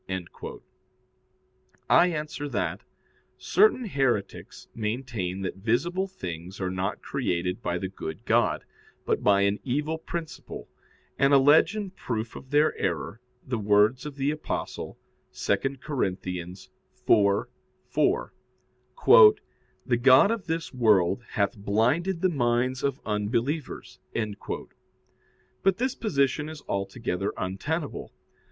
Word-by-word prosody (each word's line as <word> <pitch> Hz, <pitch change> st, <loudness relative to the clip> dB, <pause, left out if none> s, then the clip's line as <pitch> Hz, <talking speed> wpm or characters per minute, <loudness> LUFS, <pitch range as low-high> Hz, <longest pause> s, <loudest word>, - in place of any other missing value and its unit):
I 175 Hz, -, +6 dB
answer 150 Hz, -3 st, -4 dB
that, -, -, -2 dB, 0.6 s
Certain 415 Hz, -, +3 dB
heretics 135 Hz, -, -2 dB
maintain 105 Hz, -5 st, -3 dB
that 95 Hz, -, -4 dB
visible 170 Hz, -, 0 dB
things 90 Hz, -, -7 dB
are 95 Hz, -1 st, -2 dB
not 95 Hz, +2 st, -3 dB
created 90 Hz, -9 st, -2 dB
by 85 Hz, 0 st, -1 dB
the 95 Hz, -, -3 dB
good 80 Hz, -4 st, -7 dB
God, -, -, +2 dB, 0.4 s
but -, -, 0 dB
by 100 Hz, -1 st, +4 dB
an 100 Hz, +1 st, +1 dB
evil 150 Hz, +5 st, -1 dB
principle, 165 Hz, -1 st, -7 dB, 0.5 s
and 140 Hz, +1 st, +5 dB
allege 145 Hz, +8 st, +5 dB
in 205 Hz, -3 st, -4 dB
proof 115 Hz, -10 st, -4 dB
of 130 Hz, -, -10 dB
their 150 Hz, +2 st, +3 dB
error 95 Hz, +5 st, -2 dB, 0.2 s
the 125 Hz, -3 st, -2 dB
words 105 Hz, +6 st, +3 dB
of 145 Hz, -, -8 dB
the 140 Hz, +1 st, 0 dB
Apostle 155 Hz, 0 st, -5 dB, 0.4 s
(2 100 Hz, -, +1 dB, 0.3 s
Cor. 145 Hz, -4 st, -2 dB, 1.9 s
4:4), 470 Hz, -3 st, +3 dB, 0.5 s
"The 120 Hz, -3 st, +2 dB
god 130 Hz, -, +6 dB
of 230 Hz, -4 st, -3 dB
this 165 Hz, -1 st, -3 dB
world 105 Hz, -4 st, +3 dB
hath 100 Hz, 0 st, +1 dB
blinded 125 Hz, -, +1 dB
the 185 Hz, -, +3 dB
minds 125 Hz, -3 st, 0 dB
of 140 Hz, -1 st, -1 dB
unbelievers." 115 Hz, +8 st, -2 dB, 1.6 s
But 195 Hz, -1 st, +2 dB
this 255 Hz, +2 st, 0 dB
position 150 Hz, -, 0 dB
is 155 Hz, -1 st, -9 dB
altogether 100 Hz, -1 st, -2 dB
untenable. 145 Hz, -, -3 dB
130 Hz, 110 wpm, -27 LUFS, 100-155 Hz, 1.9 s, I